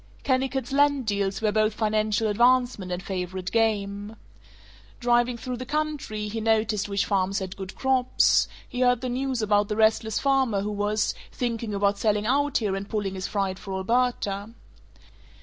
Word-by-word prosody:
Kennicott's 265 Hz, -1 st, 0 dB
land 285 Hz, -1 st, +3 dB
deals 200 Hz, -1 st, -1 dB
were 215 Hz, -, +3 dB
both 215 Hz, 0 st, +1 dB
financial 215 Hz, 0 st, +1 dB
advancement 240 Hz, -3 st, +2 dB
and 180 Hz, +1 st, -3 dB
favorite 185 Hz, -1 st, -4 dB
game. 210 Hz, -2 st, 0 dB, 0.8 s
Driving 240 Hz, 0 st, +2 dB
through 245 Hz, +2 st, -5 dB
the 255 Hz, -, -5 dB
country, 295 Hz, -8 st, -2 dB
he 220 Hz, +2 st, -4 dB
noticed 215 Hz, -2 st, +1 dB
which 200 Hz, -1 st, 0 dB
farms 195 Hz, -1 st, 0 dB
had 190 Hz, -2 st, -4 dB
good 190 Hz, -1 st, -8 dB
crops; 260 Hz, -1 st, +3 dB, 0.2 s
he 250 Hz, -, -6 dB
heard 245 Hz, -2 st, +3 dB
the 255 Hz, -, -2 dB
news 255 Hz, -1 st, -1 dB
about 205 Hz, -1 st, +2 dB
the 210 Hz, -, -2 dB
restless 220 Hz, 0 st, +2 dB
farmer 265 Hz, -7 st, +2 dB
who 210 Hz, +1 st, -3 dB
was 205 Hz, +1 st, 0 dB, 0.2 s
"thinking 230 Hz, -3 st, -3 dB
about 200 Hz, 0 st, +1 dB
selling 210 Hz, -1 st, +1 dB
out 285 Hz, +4 st, +2 dB
here 205 Hz, -4 st, -1 dB
and 195 Hz, +1 st, -5 dB
pulling 205 Hz, -3 st, -2 dB
his 190 Hz, 0 st, -4 dB
freight 195 Hz, -2 st, -2 dB
for 195 Hz, -1 st, -6 dB
Alberta." 205 Hz, -1 st, 0 dB
215 Hz, 165 wpm, -26 LUFS, 200-245 Hz, 0.8 s, land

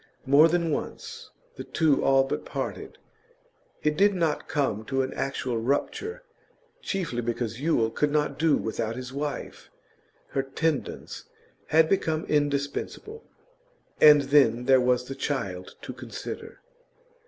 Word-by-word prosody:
More 140 Hz, +4 st, +7 dB
than 170 Hz, -1 st, 0 dB
once -, -, -5 dB, 0.3 s
the -, -, -5 dB
two 155 Hz, -4 st, +1 dB
all 135 Hz, 0 st, +5 dB
but 135 Hz, -, -3 dB
parted. -, -, -5 dB, 0.9 s
It 150 Hz, 0 st, +2 dB
did 200 Hz, +3 st, +4 dB
not 165 Hz, -4 st, -1 dB
come 135 Hz, -7 st, -1 dB
to 135 Hz, +1 st, 0 dB
an 130 Hz, -, -4 dB
actual 130 Hz, -3 st, -2 dB
rupture, 275 Hz, -, -2 dB, 0.6 s
chiefly 175 Hz, -, -2 dB
because 120 Hz, 0 st, -3 dB
Yule 120 Hz, -8 st, +2 dB
could 150 Hz, -, +1 dB
not 150 Hz, -2 st, 0 dB
do 160 Hz, -2 st, +4 dB
without 110 Hz, +1 st, -3 dB
his 125 Hz, +1 st, -7 dB
wife; 145 Hz, +1 st, -5 dB, 0.6 s
her 135 Hz, -, 0 dB
tendance 140 Hz, +2 st, -3 dB, 0.4 s
had 160 Hz, 0 st, +4 dB
become 160 Hz, -3 st, 0 dB
indispensable. 145 Hz, -, -2 dB, 0.8 s
And 150 Hz, -1 st, +9 dB
then 135 Hz, -4 st, +3 dB
there 130 Hz, -1 st, +5 dB
was 125 Hz, 0 st, +2 dB
the 135 Hz, -, -6 dB
child 95 Hz, -11 st, -4 dB
to -, -, -6 dB
consider. -, -, -8 dB
140 Hz, 130 wpm, -26 LUFS, 125-155 Hz, 0.9 s, And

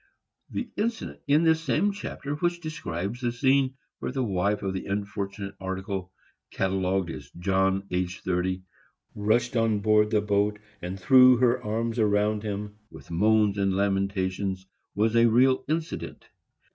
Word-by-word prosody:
The 250 Hz, -, -4 dB
incident 225 Hz, +1 st, -2 dB
in 150 Hz, +3 st, +4 dB
this 160 Hz, -1 st, +3 dB
same 165 Hz, -, +1 dB
chapter 195 Hz, -7 st, -5 dB
which 175 Hz, +3 st, -1 dB
describes 120 Hz, -, -5 dB
the 120 Hz, -1 st, 0 dB
scene 130 Hz, +2 st, +2 dB, 0.2 s
where -, -, -3 dB
the 130 Hz, 0 st, -1 dB
wife 100 Hz, -1 st, 0 dB
of 95 Hz, -1 st, -1 dB
the 95 Hz, -, -5 dB
unfortunate 100 Hz, 0 st, -4 dB
article, 95 Hz, 0 st, -4 dB, 0.4 s
catalogued 95 Hz, -2 st, 0 dB
as -, -, -9 dB
"John 95 Hz, +1 st, +1 dB
aged 90 Hz, 0 st, -2 dB
30," 95 Hz, 0 st, -1 dB, 0.5 s
rushed 110 Hz, +4 st, +1 dB
on 115 Hz, -2 st, +2 dB
board 105 Hz, 0 st, +4 dB
the 110 Hz, -1 st, +2 dB
boat 105 Hz, 0 st, +1 dB, 0.2 s
and 90 Hz, +2 st, -5 dB
threw 130 Hz, +4 st, +7 dB
her 125 Hz, 0 st, +2 dB
arms 115 Hz, +2 st, -2 dB
around 105 Hz, 0 st, +2 dB
him, 105 Hz, 0 st, -5 dB
with 80 Hz, 0 st, -13 dB
moans 105 Hz, +3 st, +3 dB
and 95 Hz, -1 st, +1 dB
lamentations, 95 Hz, -1 st, -1 dB, 0.3 s
was 110 Hz, +2 st, +1 dB
a 115 Hz, 0 st, +6 dB
real 130 Hz, +3 st, +4 dB
incident. 160 Hz, +1 st, -4 dB
105 Hz, 145 wpm, -26 LUFS, 95-125 Hz, 0.5 s, threw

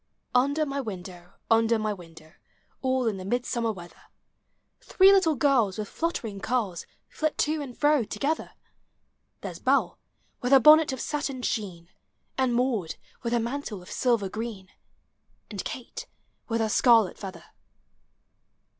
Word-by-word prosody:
Under 280 Hz, +5 st, +2 dB
niy 280 Hz, -1 st, -3 dB
window, 180 Hz, -4 st, -8 dB, 0.2 s
uuder 225 Hz, 0 st, +4 dB
my 215 Hz, -1 st, -1 dB
window, 165 Hz, -4 st, -14 dB, 0.5 s
All 260 Hz, -1 st, +1 dB
in 215 Hz, -4 st, 0 dB
the 185 Hz, -, -7 dB
Midsummer 235 Hz, +2 st, -1 dB
weather, 175 Hz, -4 st, -12 dB, 0.7 s
Three 385 Hz, +1 st, +5 dB
little 375 Hz, -6 st, +4 dB
girls 250 Hz, -9 st, +2 dB
with 210 Hz, -1 st, -4 dB
fluttering 235 Hz, -12 st, -3 dB
curls 200 Hz, -7 st, -2 dB, 0.2 s
Flit 310 Hz, -1 st, -2 dB
to 305 Hz, 0 st, 0 dB
and 260 Hz, -4 st, -8 dB
fro 295 Hz, -3 st, +3 dB
together: 275 Hz, +9 st, -3 dB, 0.4 s
— -, -, -48 dB
There -, -, -5 dB
's -, -, -12 dB
Hell -, -, +2 dB, 0.4 s
with 250 Hz, +2 st, +1 dB
her 270 Hz, -, +9 dB
bonnet 305 Hz, +3 st, +7 dB
of 260 Hz, -, -5 dB
satin 280 Hz, -3 st, -3 dB
sheen, 180 Hz, -8 st, -3 dB, 0.5 s
And 260 Hz, -2 st, +1 dB
Maud 235 Hz, -9 st, 0 dB, 0.3 s
with 235 Hz, -, -3 dB
her 240 Hz, -, +2 dB
mantle 235 Hz, -5 st, -4 dB
of -, -, -13 dB
silver 235 Hz, -6 st, +1 dB
green, 215 Hz, -2 st, -6 dB, 0.8 s
And 205 Hz, -, -4 dB
Kate 465 Hz, -, -7 dB, 0.4 s
with 230 Hz, -1 st, -1 dB
her 220 Hz, -, 0 dB
scarlet 225 Hz, -3 st, +4 dB
feather. 195 Hz, -2 st, -8 dB
235 Hz, 145 wpm, -27 LUFS, 200-275 Hz, 0.8 s, her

